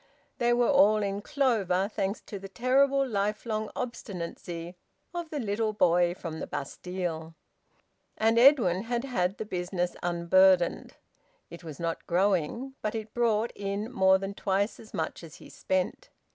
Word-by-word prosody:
They 240 0 +3
were 240 0 +3
all 215 -6 +5
in 200 0 -2
clover, 205 -8 +1
thanks 200 -1 -3
to 200 - -8
the 195 0 -9
terrible 270 +5 +2
lifelong 215 0 -2
obstinacy 175 -7 -6 0.4
of 345 -2 -4
the 300 - -3
little 215 -1 -1
boy 175 -3 +3
from 160 -3 -6
the - - -5
Bastille. 165 +2 -5 0.8
And 225 +1 +3
Edwin 235 - +5
had 240 +1 -1
had 195 -8 -1
the 220 - -4
business 180 -2 -2
unburdened. 175 +1 +3 0.6
It 170 - -10
was 155 -4 -8
not 165 -1 -3
growing, 195 - 0
but 215 +1 -2
it 220 -1 -5
brought 230 -1 +1
in 200 +3 -3
more 190 -4 +4
than 195 +1 -5
twice 200 +1 -1
as 220 - -13
much - - -4
as 160 -2 -11
he - - -14
spent. 180 +7 -2
200 Hz, 150 wpm, -28 LUFS, 180-230 Hz, 0.8 s, all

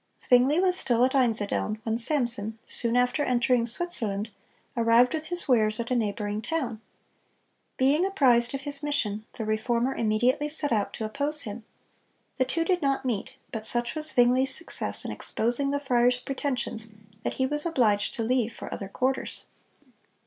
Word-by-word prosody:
Zwingle 260 +6 +3
was 370 -1 +2
still 240 0 +2
at 260 - -1
Einsiedeln 220 -4 0
when 225 -1 -1
Samson, 235 -5 0
soon 235 0 0
after 250 +4 +1
entering 245 -2 +1
Switzerland, 225 - +1 0.4
arrived 235 +1 +3
with 310 -1 -4
his 350 -1 +5
wares 215 -4 +2
at 235 +1 -4
a - - +2
neighboring 210 -2 -2
town. 245 -7 -3 1.0
Being 280 +6 +3
apprised 260 -10 +3
of 270 - -5
his 285 0 +2
mission, 220 -8 -2
the 225 - -5
Reformer 235 +4 0
immediately 240 +7 0
set 295 -1 -1
out 210 -3 0
to 220 - -4
oppose 285 +7 0
him. 220 -2 -7 0.7
The 260 - +2
two 330 +5 -1
did 360 0 0
not 275 -2 0
meet, 250 +2 -3 0.2
but 220 -2 -5
such 240 +2 -1
was 310 0 +1
Zwingle's 250 +2 +3
success - - -3
in - - -4
exposing 245 +5 +1
the 285 0 -1
friar's 245 -2 +2
pretensions 255 -4 -3 0.3
that - - -3
he 260 - -1
was 295 +4 +2
obliged 220 -10 +1
to 230 - -3
leave 240 0 0
for - - -8
other 195 - -6
quarters. 260 +5 -2
245 Hz, 165 wpm, -26 LUFS, 225-280 Hz, 1.0 s, his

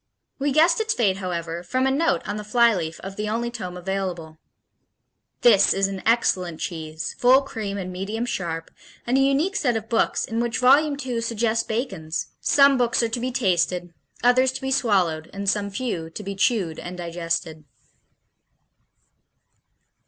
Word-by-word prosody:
We 285 +1 0
guessed 330 +6 +4
its 440 0 0
fate, 195 -5 +2
however, 170 -3 -4
from 255 +8 -1
a 265 - +2
note 275 - 0
on 205 +1 -3
the 210 - -5
flyleaf 210 -7 +2
of 195 0 -8
the 210 0 -2
only 235 +2 -2
tome 185 -7 -6
available: 180 -4 -4 1.0
"This 205 -5 +5
is 195 0 +2
an 195 -1 -5
excellent 185 -8 +1
cheese, 160 -3 -5
full 260 +3 +5
cream 210 -7 -5
and 185 -2 -5
medium 210 +6 -3
sharp, 165 -8 -4 0.3
and 245 - 0
a 270 - +4
unique 280 +8 +2
set 245 - +1
of 220 0 -7
books 230 - +1
in 225 0 -3
which 235 -1 -1
Volume 280 +4 +4
II 240 -3 -2
suggests 230 0 0
Bacon's: 190 -9 -3
'Some 275 -2 +4
books 240 0 +2
are 230 - 0
to 235 +2 -3
be 255 +2 -2
tasted, 180 -6 0 0.3
others 255 +1 +4
to 265 - -6
be 265 0 -3
swallowed, 185 - +1
and 200 0 -5
some 200 0 +1
few 200 -6 -4
to 185 +6 -8
be 200 0 -4
chewed 190 -5 0
and 180 +1 -7
digested.'" 165 -2 -3
210 Hz, 165 wpm, -23 LUFS, 180-245 Hz, 1.0 s, This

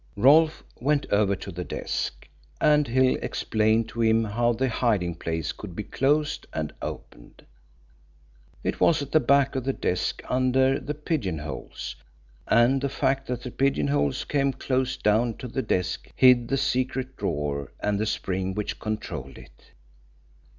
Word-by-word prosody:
Rolfe 155 +7 +5 0.2
went 145 +3 +1
over 100 -1 +3
to 95 +1 -8
the 90 +1 -5
desk, - - -4 0.3
and 150 -1 +4
Hill 130 +2 +3
explained 110 +1 +1
to 115 - -4
him 115 0 +4
how 120 +3 +1
the 125 +3 0
hiding 105 -8 0
place 80 -2 -3
could 95 -5 -9
be 105 - -3
closed 145 +5 0
and 80 -1 -3
opened. - - -9 1.2
It - - -2
was 155 -4 +3
at 140 - -9
the 155 - +5
back 140 -1 +3
of 130 - -1
the 135 +1 0
desk 90 -6 -2
under 130 +1 +2
the 150 - -5
pigeonholes, 95 - -4 0.5
and 125 +3 +4
the 140 - 0
fact 135 0 0
that 125 -1 -3
the 125 - -6
pigeonholes 70 - +1
came 140 -1 0
close 130 0 -1
down 110 +2 +1
to 125 - -6
the 130 +3 -2
desk 90 -6 -2
hid 125 -2 +6
the 135 - 0
secret 130 0 -1
drawer 70 -3 -3
and 105 -1 0
the 110 - 0
spring 95 -2 -2
which 105 -1 -3
controlled 105 - -5
it. - - -17
120 Hz, 155 wpm, -26 LUFS, 100-135 Hz, 1.2 s, hid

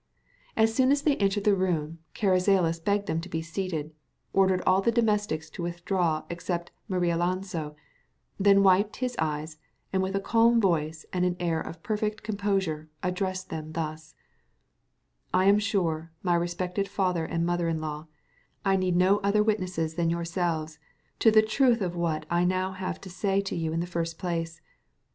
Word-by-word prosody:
As 225 0 +4
soon 260 +2 +3
as 285 0 +2
they 295 -3 +3
entered 200 0 +1
the 210 -1 +4
room, 165 -4 -1 0.2
Carrizales 185 -4 +2
begged 205 +1 +1
them 165 -3 -1
to 180 - -9
be 160 -2 -3
seated, 165 -3 -4 0.4
ordered 190 -1 +3
all 185 +1 +4
the 230 - +2
domestics 210 -8 0
to - - -7
withdraw 170 -2 -1
except 170 0 -4 0.2
Marialonso, 175 -3 -1 0.6
then 200 0 +5
wiped 195 +2 +4
his 250 -1 -2
eyes, 155 0 -2 0.3
and 190 - +2
with 190 +1 -1
a - - +2
calm 230 +3 +4
voice 160 -5 0
and 180 -1 +1
an 180 -1 +1
air 165 -2 0
of 165 0 -8
perfect 215 0 -2
composure 195 -7 -1
addressed 185 0 -2
them 155 -1 -5
thus:— 155 -1 -5 1.2
"I 185 +1 +4
am 200 +1 +6
sure, 165 -6 -1
my 175 -2 +2
respected 180 +3 -1
father 180 -4 0
and 165 +1 -1
mother 175 0 0
in 160 -1 -1
law, 155 0 -5 0.6
I 195 0 +3
need 185 -1 +1
no 185 +3 +4
other 210 +1 +2
witnesses 185 -7 -1
than 165 0 0
yourselves 170 -2 -2 0.4
to 225 - +6
the 215 0 +6
truth 240 +2 +3
of 180 -4 -2
what 160 -3 -1
I 170 +1 +1
have 180 0 +3
now 185 0 0 0.2
to 190 - -11
say 195 +2 0
to 195 - -4
you 165 -2 -1
in 165 +1 -1
the - - -2
first 165 -2 -3
place. 165 -2 -3
180 Hz, 170 wpm, -27 LUFS, 165-200 Hz, 1.2 s, am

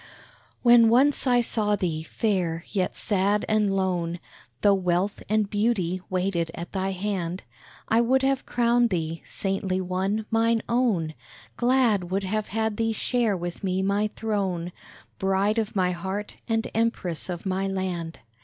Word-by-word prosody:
When 235 -2 +7
once 270 +4 +4
I 245 -1 +4
saw 210 -3 +1
thee, 170 -5 -2
fair, 170 -2 -1
yet 185 -3 -1
sad 205 0 +1
and 210 -2 +2
lone, 175 -3 -1 0.4
Tho 205 - +5
wealth 185 +1 0
and 215 -1 +2
beauty 200 -4 0
waited 180 -3 0
at 170 0 -7
thy 190 0 -1
hand 190 -2 -3 0.4
I 225 +1 +4
would 260 +3 +2
have 270 0 0
crowned 240 0 +3
thee, 165 -3 -2
saintly 195 -1 -2
one, 190 +4 -1
mine 225 0 +2
own; 220 -10 +1 0.4
Glad 240 -7 +2
would 195 +2 -1
have 215 +2 -2
had 220 0 -1
thee 225 0 +1
share 225 -2 0
with 175 +3 -6
me 190 0 0
my 200 +2 +1
throne, 190 -6 -2 0.5
Bride 195 +3 +1
of 215 -2 -3
my 180 -2 +2
heart, 190 +4 -5
and 225 0 0
Empress 215 -7 -1
of 175 0 -5
my 190 +1 -1
land! 180 -4 -3
195 Hz, 150 wpm, -25 LUFS, 185-225 Hz, 0.5 s, When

